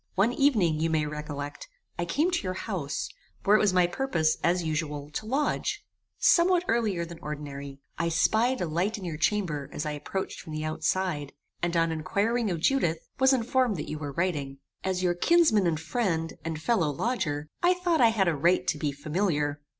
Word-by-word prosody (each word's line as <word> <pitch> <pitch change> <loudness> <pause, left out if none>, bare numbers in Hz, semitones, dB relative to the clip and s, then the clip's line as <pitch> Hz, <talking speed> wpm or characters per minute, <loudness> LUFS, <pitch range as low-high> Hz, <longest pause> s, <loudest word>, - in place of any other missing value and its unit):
One 205 +5 +3
evening, 210 - +3
you 165 +1 +1
may 155 -1 +1
recollect, 150 - -6 0.3
I 175 - 0
came 300 - +1
to 345 - 0
your 185 -2 -3
house, 180 -9 -3 0.4
where 205 - +5
it - - +5
was 210 - +3
my 180 -1 +4
purpose, 175 -6 +1
as 175 +1 +2
usual, 150 -2 -3
to 215 +8 -5
lodge, 280 +5 -1 0.3
somewhat 350 0 +4
earlier 210 -7 +1
than 170 0 -10
ordinary. 140 -2 -6 0.2
I 165 0 +1
spied 225 +10 +2
a - - +1
light 175 +7 -1
in 195 - -7
your 165 -3 -4
chamber 165 -4 0
as 150 - -4
I 150 - -1
approached 170 +6 -4
from 155 - -9
the 155 0 -3
outside, 155 -2 -1 0.3
and 175 0 0
on 165 0 +2
inquiring 205 +8 0
of 170 -3 -2
Judith, 175 -8 +2 0.2
was 265 0 +5
informed 250 -3 +2
that 150 - -5
you 155 - -4
were 145 -2 -5
writing. 145 -5 -1 0.3
As 185 -1 -1
your 175 -1 +3
kinsman 220 - +4
and 160 -2 0
friend, 165 -3 -1
and 160 -1 -3
fellow 170 -2 +1
lodger, 150 - -2
I 355 +1 +4
thought 350 -4 +1
I 235 - +7
had 210 -4 +1
a 170 - +3
right 175 +5 +2
to 155 - -1
be 150 -1 0
familiar. 150 0 -1
170 Hz, 195 wpm, -28 LUFS, 155-220 Hz, 0.4 s, I